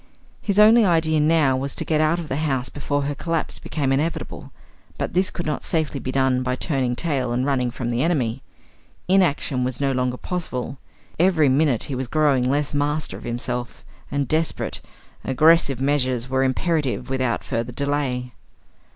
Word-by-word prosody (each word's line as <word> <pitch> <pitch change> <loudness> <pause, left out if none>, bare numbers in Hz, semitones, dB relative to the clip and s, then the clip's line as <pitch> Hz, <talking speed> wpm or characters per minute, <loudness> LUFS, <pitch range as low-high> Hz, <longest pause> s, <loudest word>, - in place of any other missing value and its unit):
His 200 -1 -1
only 220 +2 +7
idea 160 -4 +2
now 150 -3 +3
was 135 +1 -3
to - - -2
get 155 -1 +1
out 155 +2 +2
of 170 -3 -5
the 135 - -2
house 135 -5 -1
before 145 0 -2
her 145 +1 -1
collapse 165 +2 -3
became 140 -4 -2
inevitable; 150 +5 -2 0.5
but - - -3
this 185 +2 +2
could 175 - -6
not 150 - -2
safely 155 -4 -1
be 130 +1 -4
done 130 -1 +2
by 125 0 -1
turning 130 -3 -1
tail 135 -4 -1
and 125 +2 0
running 130 -3 +1
from 120 -1 -4
the 120 +1 0
enemy. 130 -7 0 0.7
Inaction 165 -8 +2
was 125 -1 -3
no 140 -1 +1
longer 125 -1 -1
possible; 135 -7 -4 0.4
every 165 -5 +4
minute 135 -3 +2
he 140 - -4
was 130 0 -3
growing 140 -3 +2
less 145 +1 0
master 145 +1 -1
of - - -10
himself, 120 +1 -4 0.2
and 140 -1 -1
desperate, 160 +4 -1 0.4
aggressive 140 -1 +4
measures 130 -3 0
were 130 0 0
imperative 135 -1 0
without 130 -3 0
further 120 -1 -3
delay. 130 -2 -2
140 Hz, 170 wpm, -22 LUFS, 130-155 Hz, 0.7 s, only